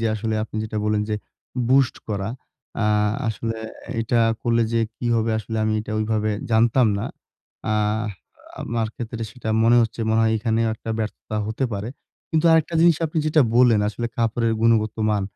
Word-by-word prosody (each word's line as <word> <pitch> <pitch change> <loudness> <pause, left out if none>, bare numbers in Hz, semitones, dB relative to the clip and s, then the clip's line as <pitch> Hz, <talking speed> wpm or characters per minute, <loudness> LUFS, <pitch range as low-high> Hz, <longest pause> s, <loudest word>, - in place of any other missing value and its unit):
যে 115 - +1
আসলে 110 +1 -2
আপনি 110 - -9
যেটা 110 0 -5
বললেন 105 0 +1
যে - - +1 0.5
boost 130 -1 +4
করা। 100 -1 -2 0.5
আ - - 0 0.5
আসলে 115 +1 -3 0.4
এটা 115 +1 0 0.3
করলে 115 -1 +2
যে 115 - +2 0.2
কি 120 - -4
হবে 115 0 +1
আসলে 110 +1 -5
আমি 110 - +1
এটা 110 - -6
ওইভাবে 110 0 0 0.2
জানতাম 115 +2 +4
না। - - -3 0.7
আহ 105 +1 +1 0.6
আমার 115 -1 -1
ক্ষেত্রে 115 -1 -5
সেটা 115 -2 -7 0.2
মনে 120 +1 +5
হচ্ছে 115 0 -3
মনে 110 - +3
হয় 110 - +3
এখানেও 115 0 +1
একটা 115 - -7
ব্যর্থতা 110 0 -4
হতে 110 +5 -2
পারে। 100 +2 -3 0.4
কিন্তু 160 0 +1
আরেকটা 160 +1 +2
জিনিস 170 -2 +5
আপনি 155 +1 -2
যেটা 155 0 +4 0.2
বললেন, 120 -4 +5
আসলে 120 +3 -3
কাপড়ের 115 0 +1
গুণগত 110 -2 +3 0.2
মান। 105 -2 +1
115 Hz, 170 wpm, -23 LUFS, 110-120 Hz, 0.7 s, মনে